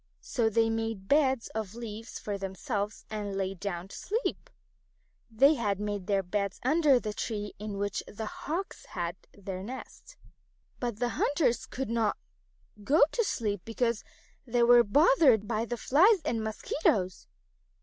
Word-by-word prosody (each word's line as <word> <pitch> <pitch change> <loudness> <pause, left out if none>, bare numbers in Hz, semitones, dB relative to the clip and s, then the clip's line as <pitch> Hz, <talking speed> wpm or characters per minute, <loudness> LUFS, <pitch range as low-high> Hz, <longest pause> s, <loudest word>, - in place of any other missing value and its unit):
So 230 -3 0
they 225 +1 +2
made 225 -3 -3
beds 265 -3 +3
of 220 -2 -5
leaves 225 -1 -7
for 205 - -4
themselves 200 +2 -4
and 205 -2 -3
lay 195 0 -1
down 185 -1 -5
to - - -9
sleep. 450 +5 -3 0.8
They 270 +7 +5
had 205 -8 -1
made 205 -2 -3
their 200 -2 +2
beds 200 +1 -2
under 290 -1 +4
the 215 -3 -4
tree 210 -2 -4
in 210 -1 -5
which 205 0 -1
the 220 +1 -6
Hawks 335 - -5
had 175 -3 -3 0.2
their 190 -2 -6
nest. 260 - -9 0.6
But 240 -4 -2
the 240 +1 0
hunters 275 0 +1
could 260 -3 -4
not 225 -3 +1 0.7
go 285 +9 +5
to 470 - +1
sleep 210 - -1
because 230 0 -1 0.4
they 240 -2 +1
were 240 0 +7
bothered 265 - +5
by 225 0 0
the 240 +1 -4
flies 350 - +4
and 230 -6 -1
mosquitoes. 215 - 0
225 Hz, 150 wpm, -29 LUFS, 205-255 Hz, 0.8 s, were